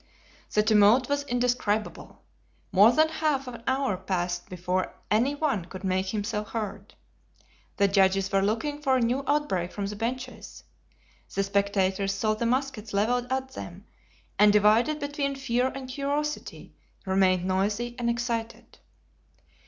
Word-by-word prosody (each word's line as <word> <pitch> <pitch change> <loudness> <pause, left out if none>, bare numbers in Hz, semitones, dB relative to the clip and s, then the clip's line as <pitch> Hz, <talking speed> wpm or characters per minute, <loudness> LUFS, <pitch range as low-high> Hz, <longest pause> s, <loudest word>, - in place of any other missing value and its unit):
The 210 - +3
tumult 215 +4 +5
was 285 0 +1
indescribable. 245 -4 -2 0.5
More 205 +4 +7
than 310 +5 +4
half 305 -4 -1
an 235 -2 -8
hour 265 -7 +1
passed 180 -1 -3
before 180 0 -2 0.2
any 245 +7 +2
one 280 - -1
could 185 +1 -10
make 190 0 0
himself 210 +1 -3
heard. 210 -2 -5 0.8
The 200 - +4
judges 195 -1 +2
were 195 0 +3
looking 230 +9 -1
for 270 -3 +2
a - - +2
new 245 +3 0
outbreak 195 -13 0
from 200 - -4
the 205 +1 -4
benches. 250 +4 -5 0.7
The 195 - +1
spectators 195 -1 0
saw 215 +2 +1
the 230 +2 -1
muskets 250 -4 -2
leveled 245 +5 0
at 265 0 -1
them, 185 -3 -9 0.5
and 210 0 +7
divided 215 +9 +3
between 285 -1 -2
fear 255 -2 0
and 265 0 -6
curiosity, 285 +3 -4 0.3
remained 190 -1 +2
noisy 205 +6 -1
and 235 -1 0
excited. 230 -1 -4
225 Hz, 140 wpm, -27 LUFS, 195-260 Hz, 0.8 s, More